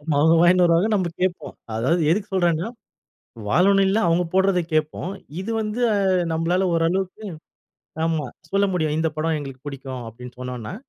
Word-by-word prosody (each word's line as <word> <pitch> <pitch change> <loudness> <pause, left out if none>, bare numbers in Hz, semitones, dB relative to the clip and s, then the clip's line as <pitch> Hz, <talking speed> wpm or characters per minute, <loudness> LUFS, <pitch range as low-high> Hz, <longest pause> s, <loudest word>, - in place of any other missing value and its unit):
அவங்க 160 +3 +4
வாங்கின்னு 175 +1 +5
வருவாங்க, 170 +5 +3
நம்ப 185 -3 0
கேட்போம். 185 -1 -2 0.2
அதாவது 140 +10 +1
எதுக்கு 205 +3 0
சொல்றேன்னா, 175 0 +1 0.8
வானொலியில 195 - +4
அவங்க 175 +2 +2
போடறத 190 -1 +3
கேட்போம். 155 +3 -1 0.3
இது 200 - -5
வந்து 215 +2 -3
அ - - +1 0.4
நம்பளால 175 +4 +1
ஓரளவுக்கு 185 +5 -1 0.8
ஆமா, 160 -4 -1 0.2
சொல்ல 200 +1 +2
முடியும். 155 -4 0
"இந்த 160 0 +1
படம் 160 +1 0
எங்களுக்கு 135 -2 -9
புடிக்கும்." 135 -3 -6
அப்படீன்னு 125 +2 -11
சொன்னோம்ன்னா, 125 - -6
170 Hz, 145 wpm, -22 LUFS, 150-190 Hz, 0.8 s, வாங்கின்னு